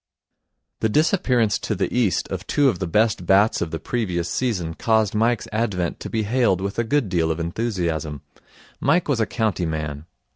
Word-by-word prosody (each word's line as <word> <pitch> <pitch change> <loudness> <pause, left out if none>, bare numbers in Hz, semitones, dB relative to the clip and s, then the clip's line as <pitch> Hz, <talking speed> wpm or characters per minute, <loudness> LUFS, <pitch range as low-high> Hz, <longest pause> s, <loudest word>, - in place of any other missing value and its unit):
The 110 - +1
disappearance 125 - +2
to 115 -1 -2
the 95 - -2
East 115 -7 +1
of - - -5
two 145 -2 +3
of 95 - -2
the 95 - -2
best 105 -1 +1
bats 100 +3 +4
of 85 - -1
the 80 - -3
previous 90 -8 -2
season 95 -11 -1
caused 110 +2 +1
Mike's 115 +2 +1
advent 100 -6 -1
to - - -6
be 110 -1 -1
hailed 110 -4 +2
with 100 +3 -3
a - - +2
good 135 +1 +1
deal 85 -3 +1
of 80 +1 -1
enthusiasm. 85 - -2 0.6
Mike 160 +6 +2
was 140 -5 +1
a 110 - +1
county 105 -7 -1
man. 75 -1 -4
105 Hz, 185 wpm, -22 LUFS, 85-115 Hz, 0.6 s, bats